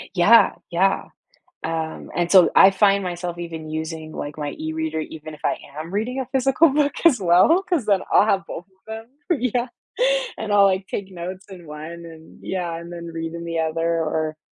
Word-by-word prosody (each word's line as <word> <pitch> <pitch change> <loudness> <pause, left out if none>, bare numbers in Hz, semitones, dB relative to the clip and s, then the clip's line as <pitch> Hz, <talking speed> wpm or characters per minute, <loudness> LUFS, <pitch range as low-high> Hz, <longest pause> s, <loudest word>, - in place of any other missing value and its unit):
Yeah, 210 +4 +6 0.2
yeah, 190 +3 +2 0.6
um, 160 -1 -4
and 175 +1 0
so 185 -3 +7
I 195 - +8
find 195 +1 +3
myself 175 -1 -4
even 165 -2 -7
using, 160 0 -5
like, 145 -1 -6
my 145 -1 -4
e-reader, 160 0 -3
even 155 0 -8
if 150 - -20
I - - +2 0.2
am 165 +4 -7
reading 235 +6 -2
a 265 - -2
physical 270 +4 +4
book, 285 +1 +1
as 285 -9 +6
well, 185 - +5
'cause 345 - -1
then 200 -3 +2
I'll - - +6
have 195 -2 +1
both 175 - -7
of 190 -1 -36
them. 220 +1 -7 0.3
Yeah, 245 0 0 0.7
and 220 -1 -4
I'll, 200 -1 +6
like, 190 0 +1
take 195 -1 -5
notes 185 +2 -7
in 180 -4 -11
one, 160 +3 -8
and 160 -1 -14
yeah, 175 -3 -3
and 170 +1 -9
then 170 0 -7
read 165 0 -5
in 170 0 -6
the 165 -1 -2
other, 160 +1 -1
or, 155 -1 -2
175 Hz, 195 wpm, -22 LUFS, 160-200 Hz, 0.7 s, I